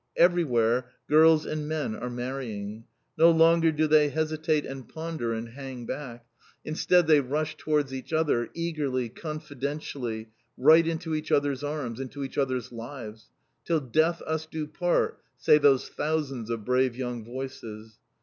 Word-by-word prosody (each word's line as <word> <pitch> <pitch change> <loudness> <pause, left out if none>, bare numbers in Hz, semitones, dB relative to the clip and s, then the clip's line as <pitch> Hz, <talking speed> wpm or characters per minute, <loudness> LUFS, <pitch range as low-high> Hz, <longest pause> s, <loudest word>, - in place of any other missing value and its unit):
Everywhere 125 -9 +3 0.2
girls 160 +1 +6
and 155 -1 -3
men 155 -7 -2
are 125 +2 -5
marrying. 120 -4 -5 0.3
No 165 +1 +8
longer 165 0 +5
do 155 0 +1
they 150 -1 +5
hesitate 155 0 0
and 135 -3 -8
ponder, 160 -7 -4
and 115 +1 -4
hang 130 -1 -8
back. 120 -3 -6 0.4
Instead 170 +3 +3
they 155 -2 +6
rush 150 +4 -2
towards 150 -3 0
each 130 +2 -7
other, 155 -7 +1
eagerly, 145 -7 -2
confidentially, 140 -5 -5 0.3
right 160 +5 +6
into 160 0 -2
each 155 0 -3
others' 145 -1 +1
arms, 145 -6 -3
into 135 +1 -5
each 135 - -4
others' 130 -4 -1
lives. 115 -2 -8 0.3
"Till 165 -2 +1
Death 160 +6 +1
us 160 0 -3
do 155 -1 -4
part!" 175 +3 0 0.2
say 150 +3 +5
those 140 -3 +4
thousands 145 -7 -2
of 115 -3 -3
brave 125 -1 +2
young 125 -2 -4
voices. 115 -3 -8
140 Hz, 150 wpm, -27 LUFS, 125-155 Hz, 0.4 s, No